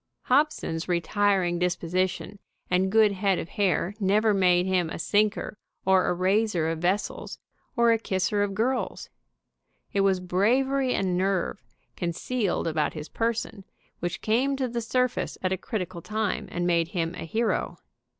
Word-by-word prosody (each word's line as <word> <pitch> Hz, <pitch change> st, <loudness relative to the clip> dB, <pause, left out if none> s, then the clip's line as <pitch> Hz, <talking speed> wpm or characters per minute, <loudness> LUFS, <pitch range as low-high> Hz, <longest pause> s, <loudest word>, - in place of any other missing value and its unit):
Hobson's 255 Hz, -, +1 dB
retiring 180 Hz, 0 st, +1 dB
disposition 180 Hz, +3 st, -1 dB, 0.3 s
and 185 Hz, +1 st, +2 dB
good 215 Hz, -1 st, +5 dB
head 195 Hz, -1 st, +1 dB
of 165 Hz, -, -5 dB
hair 195 Hz, -2 st, 0 dB
never 210 Hz, +2 st, +3 dB
made 180 Hz, -2 st, +3 dB
him 185 Hz, -3 st, +1 dB
a -, -, -5 dB
sinker 210 Hz, +3 st, 0 dB, 0.3 s
or 190 Hz, -1 st, +4 dB
a -, -, +2 dB
raiser 185 Hz, -2 st, +1 dB
of 165 Hz, -, -4 dB
vessels, 185 Hz, +4 st, -2 dB, 0.4 s
or 235 Hz, -1 st, +4 dB
a 225 Hz, -, +3 dB
kisser 200 Hz, 0 st, 0 dB
of 200 Hz, -1 st, -1 dB
girls. 250 Hz, +5 st, -1 dB, 0.8 s
It 200 Hz, -, +2 dB
was 195 Hz, -1 st, +3 dB
bravery 250 Hz, +9 st, +1 dB
and 185 Hz, -2 st, 0 dB
nerve, 190 Hz, +1 st, 0 dB, 0.3 s
con 170 Hz, -2 st, -2 dB
cealed 225 Hz, +1 st, -1 dB
about 155 Hz, -2 st, 0 dB
his 155 Hz, 0 st, -7 dB
person, 225 Hz, -3 st, -2 dB, 0.4 s
which 175 Hz, +1 st, -3 dB
came 255 Hz, +6 st, +1 dB
to 265 Hz, -1 st, -1 dB
the 235 Hz, 0 st, -3 dB
surface 250 Hz, +2 st, -1 dB
at 185 Hz, 0 st, +1 dB
a -, -, +2 dB
critical 185 Hz, -5 st, -4 dB
time 215 Hz, +2 st, -2 dB
and 175 Hz, 0 st, -2 dB
made 170 Hz, -2 st, +2 dB
him 165 Hz, -2 st, -2 dB
a 180 Hz, -, -6 dB
hero. 225 Hz, +8 st, -1 dB
195 Hz, 155 wpm, -26 LUFS, 180-220 Hz, 0.8 s, good